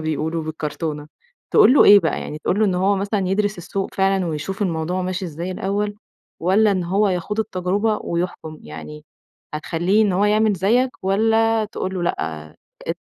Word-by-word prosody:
بيقولوا 155 +1 -2
بالكرتونة، 150 -1 -4 0.4
تقول 425 - +6
له - - +7
إيه 205 0 +8
بقى؟ 160 - -1
يعني 150 - -6
تقول 180 +5 -1
له 215 - +5
إن 190 - +1
هو 195 +3 +2
مثلًا 200 0 -1
يدرِس 205 0 0
السوق 190 +3 -4
فعلًا 195 -1 +1
ويشوف 165 +5 -4
الموضوع 175 0 -1
ماشي 185 +1 -3
إزاي 170 +2 -5
الأول، 205 +2 -2 0.5
والّا 200 +5 +3
إن 185 -3 0
هو 200 +4 +2
يخوض 190 +4 -2
التجربة 205 +1 -1
ويحكُم؟ 170 -2 -4
يعني 75 0 -10 0.5
هتخلّيه 175 +7 +1
إن 205 -3 +2
هو 190 +3 +2
يعمل 215 +1 +3
زيّك، 225 +8 +2
والّا 225 +3 +2
تقول 190 -2 -5
له 180 - -3
لأ، 80 - -3 0.4
أ - - -1
185 Hz, 170 wpm, -21 LUFS, 165-205 Hz, 0.5 s, إيه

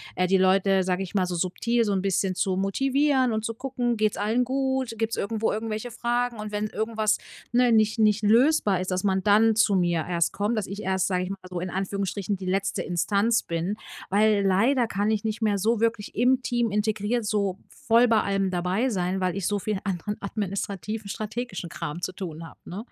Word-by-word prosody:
äh, 180 - +1
die 190 +1 +4
Leute, 190 +1 +3
sage 185 +1 -1
ich 185 - -9
mal, 190 -2 +3
so 180 0 -3
subtil 190 +7 0
so 205 - 0
'n 190 - 0
bisschen 190 -1 0
zu 185 0 0
motivieren 265 +5 +2
und 220 0 -2
zu 230 - -2
gucken, 245 -1 -2
geht's 215 -1 +1
allen 220 +4 +1
gut? 265 -1 -1
Gibt's 225 +1 -1
irgendwo 220 +2 -1
irgendwelche 220 +2 -4
Fragen? 240 0 -1
Und 210 0 -5
wenn 210 +1 -1
irgendwas, 220 0 0 0.3
ne, 245 0 +4
nicht 220 +1 +3
nicht 215 -1 +3
lösbar 225 - +4
ist, 185 - -3
dass 185 0 -1
man 190 -1 +1
dann 215 +2 +4
zu 215 -2 +4
mir 175 -3 +1
erst 170 -1 +1
kommt, 210 +3 -1
dass 210 - -1
ich 200 +2 -6
erst, 190 0 0
sage 180 -1 0
ich - - -6
mal 195 - -4
so, 180 -1 -4
in 180 +2 -4
Anführungsstrichen, 195 +1 -2
„die 185 - -8
letzte 195 +2 -1
Instanz“ 200 +6 +1
bin, 170 +4 -2 0.3
weil 205 0 +3
leider 230 +7 +3
kann 205 +1 0
ich 215 -2 -1
nicht 220 +1 -2
mehr 210 -2 +2
so 220 +3 +1
wirklich 225 -2 -1
im 250 +3 +3
Team 240 -3 0
integriert 215 +2 0
so 200 -3 0
voll 245 -3 +3
bei 225 -2 +4
allem 195 -1 0
dabei 185 +8 0
sein, 185 -3 -1
weil 185 -2 -1
ich 195 -3 -3
so 205 -1 0
viel 210 0 -2
anderen 200 +1 -3
administrativen, 200 +1 -4
strategischen 215 -3 -5
Kram 155 +1 -5
zu 180 +1 -3
tun 170 -3 -7
habe - - -16
ne? 180 - -6
205 Hz, 210 wpm, -25 LUFS, 190-225 Hz, 0.3 s, die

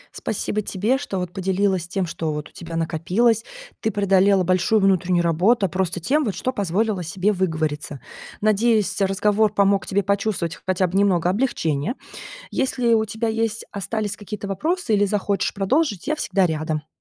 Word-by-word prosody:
Спасибо 215 0 -2
тебе, 210 +6 0
что 200 -8 -4
вот 180 -1 -4
поделилась 190 -1 0
тем, 190 +1 -1
что 165 -2 -3
вот 150 0 -5
у - - -25
тебя 165 -1 -8
накопилось. 180 +8 +1 0.4
Ты 220 - +1
преодолела 195 -1 +3
большую 185 +4 +2
внутреннюю 185 -3 +2
работу 190 +6 +3
просто 185 0 -1
тем, 265 - +1
что 255 +6 -3
позволила 200 0 0
себе 185 +5 0
выговориться. 155 -6 -2 0.4
Надеюсь, 215 0 +2
разговор 205 +2 +2
помог 200 -1 +3
тебе 200 +1 +1
почувствовать 200 -5 -1
хотя 185 0 +2
бы 180 - -6
немного 185 -4 +3
облегчения. 185 - -1 0.6
Если 250 -3 +1
у 220 -1 +4
тебя 220 +2 -3
есть 225 0 -1
остались 210 +1 -3
какие-то 205 -1 -7
вопросы 305 - 0
или 205 0 +3
захочешь 200 -1 -1
продолжить, 205 - 0
я 310 - +1
всегда 195 -9 +1
рядом. 155 -1 -3
195 Hz, 155 wpm, -22 LUFS, 180-215 Hz, 0.6 s, у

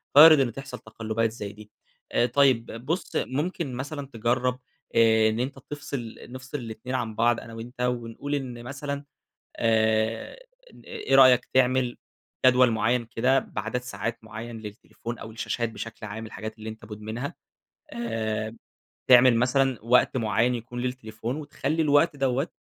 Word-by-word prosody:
وارد 155 +1 +10
إن 130 -3 +2
تحصل 135 -1 -8
تقلبات 110 0 -2
زي 105 -3 -7
دي. 105 0 -14 0.4
آآ، - - +3
طيب 125 -2 +3 0.2
بُص 165 +7 -2
ممكن 150 +1 -2
مثلًا 140 +3 -5
تجرَّب، 125 +3 0 0.4
آآ، 110 -1 +5
إن 110 +1 -2
أنت 130 +2 -3
تفصل 135 -4 -6
نفصل 130 +3 -7
ال2 120 +1 -6
عن 115 -4 -2
بعض 120 +1 +3
أنا 115 - -11
وأنت، 120 +2 -8
ونقول 125 +3 -2
إن 125 -4 -5
مثلًا، 140 +2 -5 0.5
آآ، 110 - +1 0.3
إن - - -16
إيه 440 -3 -1
رأيك 125 -2 +7
تعمل 130 -1 +2 0.5
جدول 125 -1 +6
معيَّن 120 +2 +1
كده 130 +4 +2
بعدد 110 +4 -4
ساعات 115 -1 -5
معيَّن 115 +2 -7
للتليفون 110 +2 -8
أو 110 - -8
الشاشات 115 +1 -2
بشكل 115 0 -7
عام 110 +2 -6
الحاجات 110 +1 -7
اللي 110 0 -7
أنت 110 +1 -10
مدمنها، 110 +5 -6 0.6
آآ، 110 -1 -3 0.5
تعمل 125 -1 +8
مثلًا 130 +1 +2
وقت 125 +2 +3
معيَّن 115 +2 +2
يكون 120 +1 -6
للتليفون، 120 -1 -4
وتخلي 155 +1 -2
الوقت 150 +1 +4
دوّة 135 +1 0
120 Hz, 145 wpm, -26 LUFS, 110-130 Hz, 0.6 s, وارد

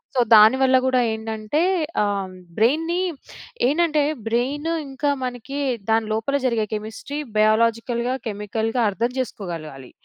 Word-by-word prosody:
So, - - +2 0.2
దానివల్ల 260 +5 +6
గూడా 255 -1 +3
ఏంటంటే 220 +6 -2 0.4
ఆహ్, 195 -2 -2 0.3
బ్రెయిన్‌ని 325 +10 +2 0.7
ఏంటంటే 305 0 +2 0.3
బ్రెయిన్ 275 +7 -1 0.2
ఇంకా 285 +2 -1
మనకి 250 +3 -5 0.3
దాని 225 0 +2
లోపల 225 +6 -1
జరిగే 225 -3 0
కెమిస్ట్రీ, 220 +7 -6 0.2
బయోలాజికల్‌గా, 230 +3 +2
కెమికల్‌గా 220 +3 -2
అర్థం 230 +5 -1
చేసుకోగలగాలి. 160 - -6
230 Hz, 105 wpm, -22 LUFS, 215-265 Hz, 0.7 s, దానివల్ల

